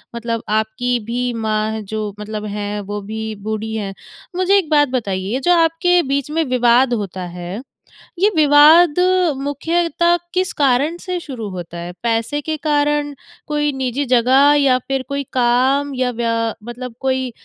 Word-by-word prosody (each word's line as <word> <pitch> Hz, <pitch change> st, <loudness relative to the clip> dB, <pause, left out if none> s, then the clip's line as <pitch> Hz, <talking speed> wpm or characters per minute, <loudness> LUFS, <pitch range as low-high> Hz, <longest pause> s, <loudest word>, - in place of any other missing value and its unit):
मतलब 230 Hz, -1 st, -3 dB
आपकी 220 Hz, +3 st, 0 dB
भी 245 Hz, +2 st, -2 dB
माँ 215 Hz, 0 st, -1 dB
जो 210 Hz, 0 st, -5 dB
मतलब 210 Hz, 0 st, -5 dB
हैं 205 Hz, 0 st, -3 dB
वो 205 Hz, 0 st, -3 dB
भी 220 Hz, +2 st, -5 dB
बूढ़ी 220 Hz, 0 st, -3 dB
हैं। 200 Hz, -3 st, -4 dB, 0.4 s
मुझे 370 Hz, +2 st, +3 dB
एक 365 Hz, -6 st, -1 dB
बात 290 Hz, -2 st, +4 dB
बताइए 205 Hz, -2 st, -2 dB
जो 350 Hz, +6 st, +3 dB
आपके 335 Hz, +2 st, +3 dB
बीच 275 Hz, +1 st, -1 dB
में 325 Hz, +1 st, +1 dB
विवाद 245 Hz, 0 st, +3 dB
होता 195 Hz, -4 st, -4 dB, 0.2 s
है, 180 Hz, +5 st, -6 dB, 0.6 s
ये 400 Hz, +3 st, +4 dB
विवाद 305 Hz, +2 st, +6 dB, 0.4 s
मुख्यता 335 Hz, +4 st, +1 dB, 0.2 s
किस 370 Hz, 0 st, 0 dB
कारण 280 Hz, +4 st, +2 dB
से 360 Hz, 0 st, -4 dB
शुरू 250 Hz, -10 st, -7 dB
होता 175 Hz, -2 st, -7 dB
है? 170 Hz, +1 st, -6 dB
पैसे 230 Hz, +5 st, 0 dB
के 315 Hz, +2 st, -3 dB
कारण 295 Hz, -1 st, 0 dB, 0.3 s
कोई 295 Hz, -1 st, 0 dB
निजी 265 Hz, +2 st, -2 dB
जगह 260 Hz, +4 st, +5 dB
या 265 Hz, -3 st, +4 dB
फिर 270 Hz, -1 st, -1 dB
कोई 280 Hz, 0 st, -2 dB
काम 260 Hz, +3 st, +2 dB
या 255 Hz, -1 st, 0 dB
व्या 230 Hz, -1 st, -1 dB, 0.3 s
मतलब 240 Hz, +1 st, -8 dB
कोई 260 Hz, -2 st, -1 dB
255 Hz, 155 wpm, -18 LUFS, 220-295 Hz, 0.6 s, विवाद